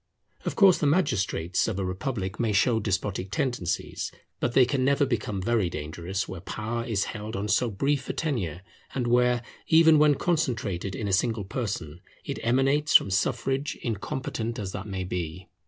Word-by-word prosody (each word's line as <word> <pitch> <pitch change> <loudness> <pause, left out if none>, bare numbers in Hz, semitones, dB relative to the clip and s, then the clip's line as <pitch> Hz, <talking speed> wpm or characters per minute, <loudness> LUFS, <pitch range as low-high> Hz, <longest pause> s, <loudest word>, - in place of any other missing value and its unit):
Of - - -2
course 195 -4 +6
the 150 - +2
magistrates 100 - +1
of 110 -4 -2
a 95 - -1
republic 95 +1 -3
may 115 -3 +1
show 115 +3 +3
despotic 95 -2 -2
tendencies; 100 -4 -2 0.3
but 120 - -1
they 130 -1 +6
can 130 +1 0
never 140 +2 +3
become 105 -6 -2
very 110 -4 +1
dangerous 85 +6 -4
where 95 -2 -7
power 110 +4 -3
is 110 -5 0
held 105 0 -6
on 100 +2 -2
so 110 +4 +2
brief 135 +6 -1
a - - 0
tenure, 95 - -2 0.3
and 125 -2 0
where, 120 0 +3 0.2
even 160 -1 +6
when 150 -1 +5
concentrated 110 - -1
in 105 - -3
a 100 - -1
single 110 +1 +1
person, 95 - -4 0.2
it - - -4
emanates 135 +5 +2
from 100 - +6
suffrage, 135 +9 0
incompetent 115 +1 -3
as 100 -4 -4
that 95 +1 -6
may 95 -2 -3
be. 90 -1 -5
110 Hz, 170 wpm, -27 LUFS, 95-130 Hz, 0.3 s, course